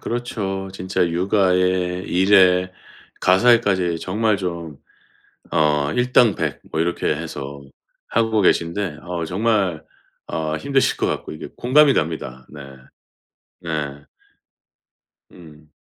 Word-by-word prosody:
그렇죠. 100 Hz, -5 st, -4 dB
진짜 95 Hz, -1 st, -1 dB
육아에 90 Hz, 0 st, +1 dB
일에 90 Hz, -1 st, +4 dB, 0.5 s
가사일까지 95 Hz, -4 st, +3 dB
정말 105 Hz, +3 st, 0 dB
좀 85 Hz, -5 st, -5 dB, 0.7 s
어 75 Hz, -2 st, +2 dB
일당백 125 Hz, -3 st, +2 dB
뭐 80 Hz, -, 0 dB
이렇게 85 Hz, +1 st, -2 dB
해서 70 Hz, 0 st, -7 dB, 0.5 s
하고 110 Hz, -1 st, +1 dB
계신데 85 Hz, -2 st, 0 dB
어 85 Hz, -2 st, -4 dB
정말 95 Hz, -3 st, 0 dB, 0.4 s
어 80 Hz, -1 st, -3 dB
힘드실 135 Hz, -, +1 dB
것 -, -, 0 dB
같고 -, -, -3 dB
이게 75 Hz, -, -8 dB
공감이 140 Hz, +3 st, +4 dB
됩니다. 65 Hz, -6 st, -3 dB
네. 75 Hz, -1 st, -10 dB, 1.0 s
네. 75 Hz, -4 st, -4 dB, 1.3 s
음. 75 Hz, -3 st, -17 dB
90 Hz, 205 characters per minute, -21 LUFS, 80-100 Hz, 1.3 s, 일에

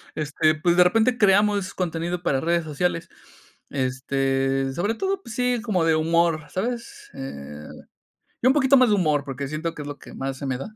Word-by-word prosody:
Este, 155 Hz, +1 st, +1 dB
pues 170 Hz, +3 st, +1 dB
de 180 Hz, -, +8 dB
repente 225 Hz, +6 st, +2 dB
creamos 205 Hz, -1 st, +3 dB
contenido 175 Hz, 0 st, -2 dB
para 135 Hz, -6 st, +1 dB
redes 170 Hz, +1 st, +1 dB
sociales. 165 Hz, +2 st, -2 dB, 0.6 s
Este, 135 Hz, 0 st, 0 dB
sobre 205 Hz, +9 st, -1 dB
todo, 385 Hz, +6 st, -2 dB
pues 230 Hz, -, -9 dB
sí, 250 Hz, -1 st, +1 dB
como 185 Hz, -6 st, +1 dB
de 160 Hz, -, +3 dB
humor, 165 Hz, 0 st, +1 dB
¿sabes? 245 Hz, -, -4 dB
Eh, 75 Hz, -, -8 dB, 0.8 s
yo 255 Hz, -, +5 dB
un -, -, +6 dB
poquito 275 Hz, -1 st, +5 dB
más 255 Hz, -3 st, +5 dB
de -, -, +4 dB
humor, 150 Hz, -6 st, +1 dB
porque 135 Hz, 0 st, -5 dB
siento 160 Hz, +2 st, -3 dB
que 150 Hz, -, -7 dB
es 145 Hz, -, -7 dB
lo 145 Hz, -, -7 dB
que -, -, -13 dB
más 135 Hz, 0 st, -4 dB
se 140 Hz, -, -5 dB
me 130 Hz, -2 st, -2 dB
da, 165 Hz, -, -6 dB
165 Hz, 195 wpm, -24 LUFS, 140-210 Hz, 0.8 s, de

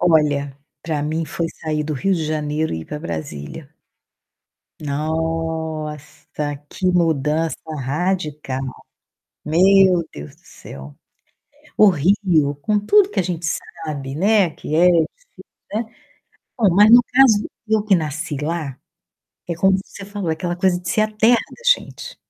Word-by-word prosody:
Olha, 145 Hz, -4 st, +2 dB, 0.3 s
pra 155 Hz, -3 st, -2 dB
mim 160 Hz, +2 st, -2 dB
foi 165 Hz, +1 st, -3 dB
sair 155 Hz, -1 st, -1 dB
do 155 Hz, -, -3 dB
Rio 195 Hz, +8 st, +1 dB
de 160 Hz, -2 st, -2 dB
Janeiro 155 Hz, 0 st, -2 dB
e 80 Hz, -, -4 dB
ir -, -, -9 dB
pra 150 Hz, -, -6 dB
Brasília. 75 Hz, -, -6 dB, 1.1 s
Nossa, 155 Hz, -1 st, -3 dB
que 185 Hz, -, -3 dB
mudança 160 Hz, -3 st, +1 dB, 0.2 s
radical! 150 Hz, -1 st, -2 dB, 0.8 s
Meu 185 Hz, +1 st, +4 dB
Deus 70 Hz, 0 st, -10 dB
do -, -, -30 dB
céu. 70 Hz, +1 st, -11 dB, 0.8 s
O 215 Hz, -, +7 dB
Rio, 170 Hz, -3 st, +2 dB
com 210 Hz, +3 st, +1 dB
tudo 400 Hz, -, +4 dB
que -, -, -2 dB
a -, -, +2 dB
gente 170 Hz, -1 st, -3 dB
sabe, 145 Hz, -4 st, -5 dB
né, 200 Hz, +1 st, +3 dB
que 155 Hz, -, -5 dB
é 175 Hz, +3 st, +5 dB
difícil, 180 Hz, -, -1 dB, 0.3 s
né, 220 Hz, +3 st, 0 dB, 0.7 s
bom, 205 Hz, -7 st, +3 dB
mas 205 Hz, +3 st, +6 dB
no 240 Hz, +1 st, +9 dB
caso, 250 Hz, -6 st, +5 dB, 0.2 s
eu 215 Hz, -1 st, +2 dB
que 205 Hz, -2 st, +4 dB
nasci 155 Hz, 0 st, -3 dB
lá, 150 Hz, -4 st, -3 dB, 0.7 s
é 170 Hz, -, -1 dB
como 190 Hz, +3 st, +3 dB
você 200 Hz, -, -11 dB
falou, 200 Hz, -4 st, -4 dB
aquela 175 Hz, +2 st, -2 dB
coisa 180 Hz, -1 st, +1 dB
de 175 Hz, -, -7 dB
ser 215 Hz, -, +2 dB
a 215 Hz, -, 0 dB
terra 220 Hz, +3 st, +4 dB
da 360 Hz, -, -8 dB, 0.2 s
gente. -, -, -10 dB
165 Hz, 145 wpm, -20 LUFS, 150-190 Hz, 1.1 s, no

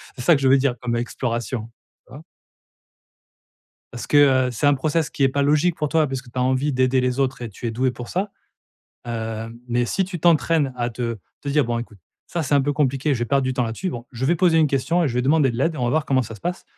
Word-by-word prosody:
C'est 125 Hz, -, -7 dB
ça 170 Hz, -, +5 dB
que 140 Hz, -, -2 dB
je 135 Hz, -, +3 dB
veux 135 Hz, -, +6 dB
dire 130 Hz, -2 st, +1 dB
comme 120 Hz, -1 st, -2 dB
exploration. 120 Hz, -1 st, -3 dB, 0.4 s
Tu -, -, -17 dB
vois? 145 Hz, +4 st, -10 dB, 1.7 s
Parce 120 Hz, -, -7 dB
que, 135 Hz, -3 st, +5 dB
heu, -, -, -3 dB
c'est 120 Hz, -, -2 dB
un 145 Hz, -, +5 dB
process 155 Hz, +3 st, 0 dB
qui 140 Hz, -, -2 dB
est -, -, +6 dB
pas 140 Hz, +2 st, -1 dB
logique 150 Hz, +4 st, +2 dB
pour 150 Hz, -3 st, -2 dB
toi, 160 Hz, -2 st, +2 dB
parce 135 Hz, -1 st, -4 dB
que 130 Hz, -, -16 dB
tu 125 Hz, -, -5 dB
as -, -, +2 dB
envie 130 Hz, +3 st, +1 dB
d'aider 130 Hz, 0 st, +2 dB
les 125 Hz, +1 st, -1 dB
autres 130 Hz, -2 st, 0 dB
et 120 Hz, -, -5 dB
tu 115 Hz, +4 st, -6 dB
es 115 Hz, -, -2 dB
douée 125 Hz, +3 st, 0 dB
pour 120 Hz, -1 st, -8 dB
ça, 195 Hz, +3 st, -2 dB, 0.7 s
hem, 115 Hz, 0 st, -5 dB
mais 120 Hz, 0 st, +1 dB
si 190 Hz, -, 0 dB
tu 185 Hz, -1 st, -6 dB
t'entraînes 160 Hz, -5 st, +2 dB
à 120 Hz, 0 st, -1 dB
te 115 Hz, -1 st, -4 dB, 0.2 s
te 140 Hz, -, -6 dB
dire: 145 Hz, 0 st, +2 dB
«Bon 120 Hz, 0 st, -1 dB
écoute, 115 Hz, -4 st, -8 dB, 0.3 s
ça 170 Hz, -, -3 dB
c'est 145 Hz, -, 0 dB
un 140 Hz, -, +5 dB
peu 145 Hz, +2 st, 0 dB
compliqué, 140 Hz, 0 st, +1 dB
je 120 Hz, -, -4 dB
vais -, -, +1 dB
perdre 135 Hz, +2 st, +1 dB
du 130 Hz, -, -1 dB
temps 125 Hz, -, 0 dB
là-dessus. 115 Hz, +11 st, -3 dB
Bon, 120 Hz, -6 st, -7 dB
je 125 Hz, +2 st, -4 dB
vais 170 Hz, +5 st, +3 dB
poser 170 Hz, -2 st, +3 dB
une 155 Hz, -, +5 dB
question 155 Hz, +5 st, +1 dB
et 150 Hz, -, +1 dB
je 120 Hz, -, -5 dB
vais 125 Hz, -, +1 dB
demander 145 Hz, 0 st, +3 dB
de -, -, -5 dB
l'aide 160 Hz, +6 st, 0 dB
et -, -, -7 dB
on 125 Hz, -, -1 dB
va 120 Hz, -, +1 dB
voir 155 Hz, +2 st, +1 dB
comment 130 Hz, -2 st, +2 dB
ça 115 Hz, 0 st, -8 dB
se -, -, -13 dB
passe» 175 Hz, +1 st, -4 dB
130 Hz, 280 wpm, -22 LUFS, 120-150 Hz, 1.7 s, veux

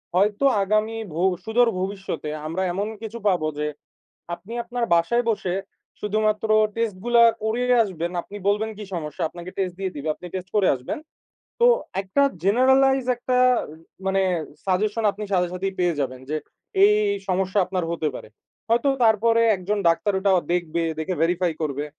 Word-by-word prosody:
হয়তো 205 Hz, +7 st, +2 dB, 0.2 s
আগামী 215 Hz, +3 st, 0 dB, 0.2 s
ভো 175 Hz, -, 0 dB, 0.2 s
সুদূর 235 Hz, +1 st, +3 dB
ভবিষ্যতে 190 Hz, -5 st, -4 dB, 0.2 s
আমরা 185 Hz, +4 st, -2 dB
এমন 200 Hz, +3 st, -2 dB
কিছু 225 Hz, +1 st, -6 dB
পাবো 175 Hz, -5 st, +2 dB
যে, 150 Hz, -, 0 dB, 0.7 s
আপনি 205 Hz, +6 st, -12 dB
আপনার 240 Hz, 0 st, -2 dB
বাসায় 235 Hz, +9 st, +2 dB
বসে, 185 Hz, -4 st, -1 dB, 0.5 s
শুধুমাত্র 215 Hz, +1 st, 0 dB, 0.3 s
টেস্ট 225 Hz, -4 st, -1 dB
গুলা 240 Hz, -1 st, +5 dB, 0.2 s
করিয়ে 245 Hz, +3 st, +1 dB
আসবেন, 175 Hz, -3 st, -4 dB
আপনি 205 Hz, -, -11 dB
বলবেন 215 Hz, +2 st, +1 dB
কি 210 Hz, -, -6 dB
সমস্যা? 150 Hz, -3 st, -4 dB
আপনাকে 175 Hz, +2 st, -9 dB
টেস্ট 185 Hz, -2 st, -1 dB
দিয়ে 190 Hz, -1 st, -3 dB
দিবে। 145 Hz, +2 st, -5 dB
আপনি 180 Hz, -, -11 dB
টেস্ট 185 Hz, 0 st, -5 dB
করে 195 Hz, -3 st, +4 dB
আসবেন। 125 Hz, -, -5 dB, 0.6 s
তো, 480 Hz, -, +6 dB, 0.4 s
একটা 195 Hz, +9 st, +1 dB, 0.2 s
জেনারালাইজ 265 Hz, +4 st, +4 dB
একটা, 250 Hz, +1 st, 0 dB, 0.7 s
মানে, 195 Hz, 0 st, +2 dB, 0.4 s
সাজেশন 210 Hz, +4 st, 0 dB
আপনি 210 Hz, +1 st, -6 dB
সাথে, 180 Hz, -2 st, +2 dB
সাথেই 190 Hz, +1 st, -3 dB
পেয়ে 175 Hz, -4 st, +1 dB
যাবেন, 130 Hz, -1 st, -3 dB
যে 155 Hz, -, 0 dB, 0.5 s
এই, 205 Hz, -, +8 dB
এই, -, -, +1 dB
এই, -, -, -4 dB
সমস্যা 190 Hz, +2 st, 0 dB
আপনার 185 Hz, -2 st, -2 dB
হতে 160 Hz, -2 st, -1 dB
পারে। -, -, -10 dB, 0.4 s
হয়তো, 240 Hz, +4 st, +3 dB, 0.2 s
তারপরে 230 Hz, +1 st, +4 dB
একজন 200 Hz, +3 st, -2 dB
ডাক্তার 200 Hz, +5 st, +1 dB
ওটা 195 Hz, 0 st, +2 dB, 0.2 s
দেখবে, 170 Hz, -1 st, -1 dB, 0.2 s
দেখে 180 Hz, +3 st, -2 dB
ভেরিফাই 175 Hz, 0 st, +1 dB
করবে। 145 Hz, -1 st, -2 dB
195 Hz, 160 wpm, -23 LUFS, 175-220 Hz, 0.7 s, এই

